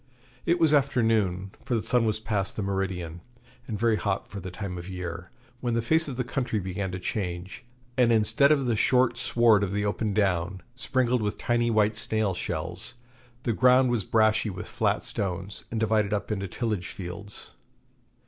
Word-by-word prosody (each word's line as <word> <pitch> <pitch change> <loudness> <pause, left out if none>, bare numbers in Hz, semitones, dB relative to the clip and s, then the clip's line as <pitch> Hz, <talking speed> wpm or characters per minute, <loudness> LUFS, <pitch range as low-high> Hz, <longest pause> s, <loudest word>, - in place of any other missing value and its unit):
It 170 - +4
was 160 -2 +4
after 140 -4 +3
noon, 95 -4 +1
for 120 - -1
the 110 - -1
sun 115 +1 +2
was 110 -1 0
past 105 -3 -1
the 105 - -2
meridian, 95 -4 -3 0.5
and 110 - -3
very 115 -1 +3
hot 100 -2 -2
for 100 - -7
the 95 0 -6
time 90 0 -5
of 85 +2 -8
year, 90 -1 -6 0.3
when 120 -2 -1
the 115 - +2
face 160 +6 +2
of 135 - -4
the 125 - -1
country 125 -3 -2
began 95 0 -3
to 90 - -3
change; 90 +2 -4 0.4
and 120 -2 +5
instead 115 +6 +5
of 140 -3 +3
the 120 -2 +1
short 125 +2 +3
sward 115 -3 +4
of 100 -2 -1
the 105 0 0
open 105 0 -1
down, 95 -2 0
sprinkled 125 -1 0
with 105 0 -2
tiny 120 0 +1
white 110 -1 +2
snail 110 -2 0
shells, 85 +4 -5 0.5
the 115 - 0
ground 125 +2 +5
was 115 -4 +1
brashy 110 +1 +2
with 95 -2 -6
flat - - 0
stones, 95 0 -3
and 115 - -2
divided 110 -2 +1
up 105 +1 -2
into 100 -2 -2
tillage 105 -2 -2
fields. 100 +3 -8
105 Hz, 185 wpm, -27 LUFS, 95-120 Hz, 0.5 s, and